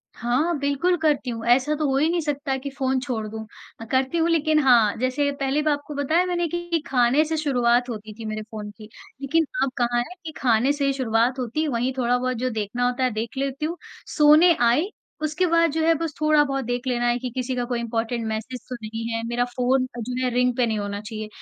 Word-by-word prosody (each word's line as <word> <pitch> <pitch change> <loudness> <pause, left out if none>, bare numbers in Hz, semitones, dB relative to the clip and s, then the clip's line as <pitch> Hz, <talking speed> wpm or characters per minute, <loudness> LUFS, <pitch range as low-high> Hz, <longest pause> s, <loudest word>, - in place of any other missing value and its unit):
हाँ, 280 +8 0
बिल्कुल 285 +6 +1
करती 300 -5 +1
हूँ। 230 -1 -5
ऐसा 265 +5 +3
तो 305 0 -1
हो 270 - +1
ही 300 +3 +3
नहीं 345 +1 +1
सकता 285 -2 -2
कि 280 +2 -6
फ़ोन 265 -1 -1
छोड़ 250 -5 -3
दूँ। 220 +1 -7 0.4
अ, - - -6
करती 265 +5 +1
हूँ, 330 0 +2
लेकिन 310 -2 +3
हाँ, 235 -6 +5
जैसे 260 +4 0
पहले 275 +2 +1
भी 305 0 +1
आपको 290 +1 -3
बताया 310 +6 +2
मैंने 350 -1 0
कि 345 0 -2
खाने 255 +2 +3
से 320 +1 -2
शुरुआत 250 -4 +2
होती 215 -2 -6
थी 225 - -6
मेरे 215 0 -4
फ़ोन 210 -1 -6
की। 215 -1 -12 0.3
लेकिन 320 +4 +2 0.2
अब 270 - 0
कहाँ 240 -1 +1
है 245 +9 -4
कि 320 - -5
खाने 245 +2 +3
से 285 -1 -1
ही 275 - +2
शुरुआत 245 0 +1
होती, 260 +6 -1
वहीं 245 -1 0
थोड़ा 245 -1 +2
बहुत 255 0 -2
जो 255 +2 -1
देखना 220 +2 -2
होता 250 +1 -1
है, 255 - +2
देख 225 +3 -4
लेती 275 +2 -2
हूँ। 335 +3 -3 0.4
सोने 305 +4 +7
आई, 245 - +3 0.3
उसके 310 +4 0
बाद 335 -1 +3
जो 320 +2 -1
है, 330 - +5
बस 320 -1 -3
थोड़ा 305 -1 +5
बहुत 275 -2 -2
देख 245 +2 -3
लेना 240 -1 0
है 240 0 +2
कि 250 0 -4
किसी 255 0 -2
का 245 - -1
कोई 240 -1 -2
इम्पॉर्टेंट 230 0 -2
मैसेज 220 +3 -4
तो 250 - -4
नहीं 225 +1 -5
है। 230 - -1
मेरा 240 +1 0
फ़ोन 255 +1 +2
अ, - - -4
जो 250 +2 -3
है, 255 - +1
रिंग 250 0 +2
पे 250 - +3
नहीं 220 -2 -1
होना 205 0 -4
चाहिए। 215 0 -6
255 Hz, 240 wpm, -24 LUFS, 235-295 Hz, 0.4 s, सोने